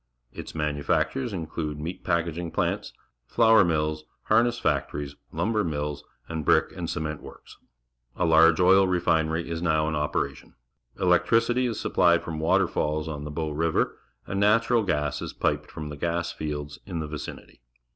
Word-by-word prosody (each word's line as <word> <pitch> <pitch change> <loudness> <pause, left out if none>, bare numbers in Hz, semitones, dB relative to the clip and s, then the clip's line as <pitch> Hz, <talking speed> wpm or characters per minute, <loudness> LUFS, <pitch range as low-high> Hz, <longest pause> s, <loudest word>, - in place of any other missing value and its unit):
Its - - -8
manufac 75 -2 0
tures 130 -3 -3
include 80 -4 -4
meat 80 +4 -6
packing 85 0 -1
plants, - - -1 0.4
flour 110 -2 +5
mills, 75 -2 -1 0.2
harness 120 +1 +3
factories, 75 -10 -2 0.2
lumber 110 -1 0
mills, 75 -3 -3 0.2
and 80 -1 -4
brick - - +3
and - - -4
cement 75 -1 -3
works. - - -13 0.6
A 90 - 0
large 80 +1 +5
oil 95 +1 +6
refinery 80 -2 +1
is 85 0 -4
now 80 -2 +1
in 80 - -1
operation. 75 0 -3 0.4
Electricity 115 +7 +3
is 115 - -3
supplied 85 -1 +3
from 80 -2 -5
waterfalls 80 -3 +1
on 75 -2 -5
the - - -5
Bow 75 +1 -3
River, 80 +2 0 0.3
and 95 - -3
natural 115 +3 +3
gas 75 -8 -1
is - - -5
piped - - -1
from 75 -1 -7
the 75 - -7
gas 85 +2 -1
fields 75 -1 -5
in 90 -4 -4
the 80 - -3
vicinity. 75 0 -8
80 Hz, 155 wpm, -26 LUFS, 75-95 Hz, 0.6 s, oil